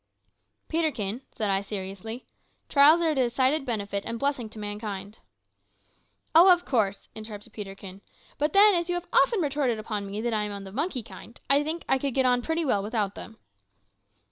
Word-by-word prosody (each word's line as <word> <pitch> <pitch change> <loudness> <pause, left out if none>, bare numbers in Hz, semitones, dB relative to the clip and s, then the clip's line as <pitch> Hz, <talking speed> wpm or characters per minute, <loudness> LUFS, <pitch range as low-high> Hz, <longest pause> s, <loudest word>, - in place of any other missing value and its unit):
"Peterkin," 265 -9 -1
said 210 -2 -2
I 195 0 +1
seriously, 200 +4 -6 0.4
"trials 305 +4 +6
are 325 - +2
a - - 0
decided 265 +2 +1
benefit 200 -3 -2
and 230 - -4
blessing 270 -3 -1
to 220 - -12
mankind 205 -1 -6 0.6
" - - -40
"Oh, 350 +4 +8
of 355 0 +3
course," 205 -6 0
interrupted 215 0 -9
Peterkin; 195 -2 -9 0.4
"but 295 +1 0
then, 410 +1 +7
as 345 -1 0
you 355 - +1
have 350 0 -4
often 450 -6 +4
retorted 280 -6 0
upon 215 -2 -4
me 200 +2 -5
that 235 +1 -1
I 215 - +1
am 210 0 -3
of 200 -1 -6
the 190 - -9
monkey 270 - -2
kind, 230 +1 -12
I 280 +1 +5
think 320 +3 -3
that - - +1
I - - +3
could 275 -2 -2
get 265 -1 +3
on 250 -1 +3
pretty 320 +5 -1
well 210 -7 +2
without 210 -1 -1
them." 220 +1 -10
235 Hz, 195 wpm, -27 LUFS, 205-295 Hz, 0.6 s, Oh